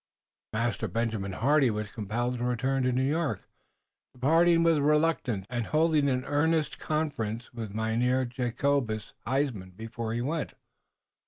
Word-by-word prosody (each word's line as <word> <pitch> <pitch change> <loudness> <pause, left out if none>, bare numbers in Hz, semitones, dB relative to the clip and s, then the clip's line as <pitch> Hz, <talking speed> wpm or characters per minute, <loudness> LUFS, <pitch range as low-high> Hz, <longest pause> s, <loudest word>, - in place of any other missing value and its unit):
Master 110 0 -1
Benjamin 110 -1 -2
Hardy 135 +5 +3
was 105 -1 -3
compelled 120 +3 -2
to - - -2
return 130 +2 0
to 125 0 +2
New 130 +2 +1
York, 155 0 -1 0.7
departing 165 +6 +4
with 165 -2 +4
reluctance 150 - +1
and 120 -2 -3
holding 155 -2 +3
an 125 -1 0
earnest 155 +1 +1
conference 125 -8 -2
with 110 -4 -6
Mynheer 120 +4 +1
Jacobus 120 -1 -1
Huysman 125 -9 -1
before 115 0 -4
he 120 - -1
went. 150 +5 -2
125 Hz, 135 wpm, -28 LUFS, 110-145 Hz, 0.7 s, departing